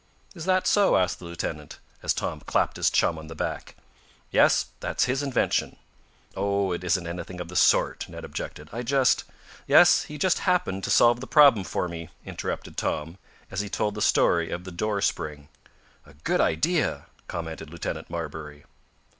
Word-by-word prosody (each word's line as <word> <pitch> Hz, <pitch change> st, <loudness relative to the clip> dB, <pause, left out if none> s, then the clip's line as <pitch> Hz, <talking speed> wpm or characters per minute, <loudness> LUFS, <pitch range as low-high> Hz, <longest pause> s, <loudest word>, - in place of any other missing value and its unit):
"Is 170 Hz, -4 st, -8 dB
that 185 Hz, 0 st, +2 dB
so?" 205 Hz, -2 st, +4 dB
asked 90 Hz, 0 st, 0 dB
the 90 Hz, -, -10 dB
lieutenant, 85 Hz, 0 st, -5 dB, 0.2 s
as -, -, 0 dB
Tom -, -, -2 dB
clapped -, -, 0 dB
his -, -, +3 dB
chum 80 Hz, -, +1 dB
on 80 Hz, -, -10 dB
the 80 Hz, -, -9 dB
back. -, -, -4 dB, 0.6 s
"Yes, -, -, +4 dB
that's -, -, 0 dB
his 130 Hz, +2 st, 0 dB
invention." 135 Hz, -3 st, 0 dB, 0.6 s
"Oh, 100 Hz, 0 st, 0 dB
it 90 Hz, 0 st, -3 dB
isn't 90 Hz, 0 st, 0 dB
anything 90 Hz, +1 st, -6 dB
of 85 Hz, -1 st, -6 dB
the 90 Hz, -, -9 dB
sort," -, -, +3 dB
Ned -, -, -8 dB
objected. 75 Hz, -, -7 dB
"I 120 Hz, -, -3 dB
just 130 Hz, +1 st, +2 dB, 0.2 s
" -, -, -21 dB
"Yes, -, -, +6 dB
he 150 Hz, -, -8 dB
just 185 Hz, +5 st, +2 dB
happened 180 Hz, -, 0 dB
to -, -, -4 dB
solve 120 Hz, 0 st, +5 dB
the 130 Hz, -, -7 dB
problem 140 Hz, -, +6 dB
for 90 Hz, -, -2 dB
me!" 85 Hz, -2 st, -7 dB, 0.2 s
interrupted -, -, -5 dB
Tom, 80 Hz, +5 st, -3 dB, 0.3 s
as 95 Hz, -, -1 dB
he 100 Hz, -, -5 dB
told 105 Hz, +1 st, -1 dB
the 105 Hz, -, -6 dB
story 85 Hz, -4 st, +3 dB
of 90 Hz, -, -4 dB
the 95 Hz, -, -8 dB
door 100 Hz, +3 st, -1 dB
spring. 75 Hz, -4 st, -2 dB, 0.6 s
"A 70 Hz, -, -17 dB
good 75 Hz, -, 0 dB
idea!" 115 Hz, -, +1 dB, 0.2 s
commented 80 Hz, -2 st, -6 dB
Lieutenant 85 Hz, +1 st, -5 dB
Marbury. 75 Hz, -3 st, -6 dB
90 Hz, 180 wpm, -26 LUFS, 85-125 Hz, 0.6 s, Yes